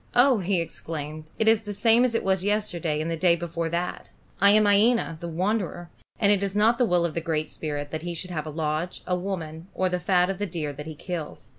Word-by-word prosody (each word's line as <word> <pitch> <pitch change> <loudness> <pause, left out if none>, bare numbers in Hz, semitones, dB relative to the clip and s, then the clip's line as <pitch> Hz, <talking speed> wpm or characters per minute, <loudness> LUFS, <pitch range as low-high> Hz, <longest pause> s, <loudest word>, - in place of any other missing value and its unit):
"Oh!" 245 -1 +5
he 190 0 +1
exclaimed, 155 -2 -5
"it 220 - +1
is 225 -1 +5
the 205 -2 -6
same 230 +3 +4
as 245 -2 +1
it - - 0
was 190 -1 +1
yesterday 180 -7 -1
and 165 +2 -2
the - - 0
day 170 +1 +4
before 170 -1 -3
that. 175 +2 -3 0.3
I 200 - +7
am 215 +1 +5
Iena, 205 -3 +3
the 170 - -5
Wanderer, 175 0 -2 0.3
and 205 -1 +4
it 200 -2 +3
is 200 0 -2
not 225 +3 +3
the 250 - +5
will 175 -4 +2
of 165 - -2
the 170 - -2
Great 155 -2 -2
Spirit 145 -2 -4
that 155 - -3
he 175 0 -4
should 180 +2 -5
have 155 -2 -3
a - - -3
lodge, 155 +2 -3
a 180 - 0
woman, 175 -3 -5
or 185 0 +1
the 180 0 -1
fat 180 +1 +2
of 190 - -6
the 205 - -1
deer 160 -4 -4
that 150 +2 -8
he 155 - -6
kills." 170 -1 -6
180 Hz, 250 wpm, -26 LUFS, 160-205 Hz, 0.3 s, I